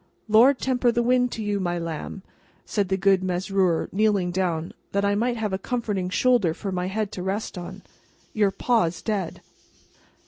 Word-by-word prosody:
"Lord 235 +6 +6
temper 250 -2 +1
the 235 0 +1
wind 250 0 +2
to 220 - -4
you, 205 -1 -1
my 175 -2 -1
lamb!" 165 +3 -5 0.4
said 200 -3 -1
the 190 - +1
good 195 0 +3
Mesrour, 185 -1 0
kneeling 200 -3 +2
down, 175 -3 -1 0.2
that 200 0 +1
I 200 - +2
might 235 +3 0
have 215 -3 -2
a 190 - -1
comforting 205 -5 -2
shoulder 210 -6 +2
for 195 +1 -5
my 180 0 -2
head 210 +1 -2
to 180 - -6
rest 195 +4 -3
on, 185 +2 -8 0.5
"your 210 -2 +3
Pa's 195 -5 0
dead!" 200 -6 -2
195 Hz, 175 wpm, -24 LUFS, 180-220 Hz, 0.5 s, Lord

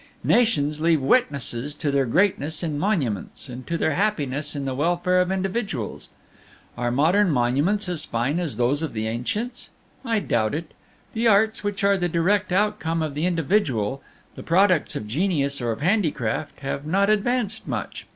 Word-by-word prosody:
"Nations 155 -11 +2
leave 165 -1 +3
witnesses 140 - 0
to 145 -1 -1
their 140 -2 +1
greatness 160 - +1
in 150 -3 -2
monuments, 145 - -2
and 125 0 -8
to 170 - -1
their 160 - +1
happiness 150 -7 0
in 140 -1 -3
the 135 - -2
welfare 175 +5 +1
of 180 +1 0
individuals. 190 - -3 0.7
Are 120 0 -1
modern 170 +10 +3
monuments 145 - +1
as 175 -4 -1
fine 125 +8 -1
as 160 -11 -3
those 125 +5 +1
of 160 - -3
the 110 -1 -2
ancients? 210 - -3 0.3
I 230 -3 0
doubt 115 - 0
it. 160 0 -5 0.4
The 230 +1 +1
arts, 220 +1 +3
which 205 0 -3
are 200 0 +4
the 175 -1 -1
direct 185 +4 +1
outcome 175 -4 0
of 155 -2 -3
the 150 +5 0
individual, 145 - 0 0.3
the - - -9
products 180 0 +2
of 105 - -4
genius 140 - 0
or 120 -1 0
of 110 - -5
handicraft, 155 - -1
have 140 0 -3
not 195 +6 +2
advanced 220 0 0
much. - - -5
160 Hz, 170 wpm, -24 LUFS, 135-200 Hz, 0.7 s, are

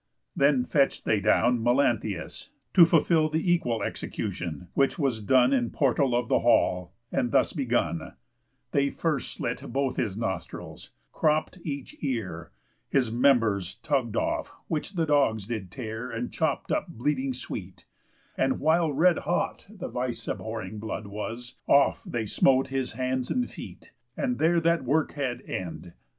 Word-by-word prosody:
Then 140 -3 +3
fetch'd 140 0 +1
they 110 - +2
down 115 +4 +3
Melanthius, 120 -5 0 0.2
to 175 - +9
fulfill 160 -1 +3
The 160 +3 +2
equal 120 -11 0
execution; 85 0 -4
which 135 -1 +2
was 135 -7 0
done 125 +4 +4
In 120 -3 +1
portal 135 -2 +2
of 120 -2 0
the - - +3
hall, 90 -6 +2 0.2
and 120 - 0
thus - - +3
begun: 120 - -1 0.6
They 140 0 +2
first 155 -5 -2
slit - - -3
both 135 -1 -1
his 105 -4 -1
nostrils, 95 -6 -5 0.2
cropp'd 155 +4 +1
each 140 -4 -5
ear, 95 - -3 0.4
His 125 -5 +2
members 115 -7 +2
tugg'd 120 -1 -1
off, - - -1 0.2
which 160 +5 -3
the 165 -3 +1
dogs 135 -9 +2
did 110 -5 -4
tear 115 +2 -5
And 115 +1 -4
chop - - -1
up - - 0
bleeding 135 +2 -1
sweet; 95 -7 -7 0.5
and, 130 0 +1
while 160 +1 +3
red 165 +5 +4
hot - - -2
The - - -7
vice - - -4
abhorring 110 - -4
blood 110 0 -5
was, 115 +5 -6
off 140 0 +4
they 115 -2 -2
smote 130 +5 +3
His 135 -3 -2
hands 130 +1 -1
and 250 -1 0
feet; - - -11 0.3
and 250 -3 -1
there 170 +2 +4
that 170 -1 +2
work 145 +5 +1
had 135 -4 -3
end. 85 -1 -6
125 Hz, 150 wpm, -27 LUFS, 110-140 Hz, 0.6 s, to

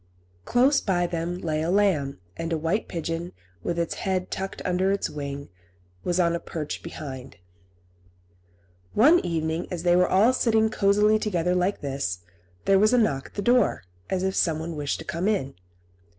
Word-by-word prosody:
Close 265 +4 +3
by 175 -3 +1
them 170 +1 -3
lay 155 -4 -2
a 160 - -1
lamb, 180 - +2 0.2
and 165 0 -4
a 165 - +1
white 165 +8 -1
pigeon, 165 +1 -4 0.3
with 170 - -2
its 170 -1 -1
head 185 -1 -1
tucked 195 0 -4
under 185 +1 +1
its 200 - -1
wing, 140 -1 -6 0.5
was 175 0 0
on 170 -1 +3
a 170 - -1
perch 155 -3 -5
behind. 135 -6 -8 1.6
One 305 +11 +6
evening, 160 0 -2
as 175 -2 -4
they 175 -1 +4
were 180 0 +4
all 215 +7 +4
sitting 220 -3 +2
cosily 210 +2 +3
together 180 -5 0
like 180 +2 0
this, 135 -11 -3 0.4
there 195 -1 +5
was 215 +4 +4
a - - +5
knock 140 - +1
at - - -21
the 205 - -2
door, 245 - +3 0.3
as 190 -1 -1
if 190 0 0
someone 160 -1 0
wished 145 -2 -2
to - - -9
come 170 +4 -2
in. 190 -11 0
175 Hz, 175 wpm, -25 LUFS, 160-200 Hz, 1.6 s, One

